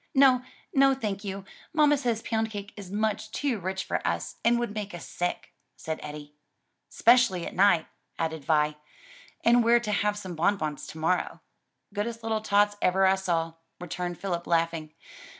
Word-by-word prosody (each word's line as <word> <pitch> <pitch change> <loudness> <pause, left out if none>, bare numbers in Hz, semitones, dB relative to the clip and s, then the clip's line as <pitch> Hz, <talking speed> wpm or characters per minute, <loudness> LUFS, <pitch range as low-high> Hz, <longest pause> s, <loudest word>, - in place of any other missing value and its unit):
"No, 265 -2 +6 0.3
no, 270 0 +5
thank 210 -6 -3
you: 195 -1 -5 0.3
mamma 300 -2 +5
says 240 -5 -1
pound 225 -1 -1
cake 205 -1 -7
is 200 -3 -9
much 215 +1 -1
too 250 -1 -1
rich 190 +1 -3
for - - -1
us, - - -2
and 235 +1 +4
would 235 -3 -2
make 205 -3 -5
us 175 - -8
sick," 175 0 -3 0.2
said 160 0 -4
Eddie. 150 0 -8 0.6
"'Specially 235 -7 +4
at - - -6
night," 185 -4 +4 0.3
added 160 -2 -2
Vi, 150 0 +2 0.7
"and 240 0 +6
we're 235 +1 +5
to 215 -3 -3
have 205 +1 +1
some 185 -3 -6
bonbons 160 -3 -1
to - - -9
morrow." 165 +3 0 0.5
"Goodest 225 +2 -3
little 220 -1 -1
tots 205 -1 +2
ever 190 +1 +3
I 190 - +5
saw," 170 -4 -1 0.3
returned 175 0 -4
Philip 175 -3 -3
laughing. 165 -2 0
200 Hz, 170 wpm, -27 LUFS, 170-225 Hz, 0.7 s, No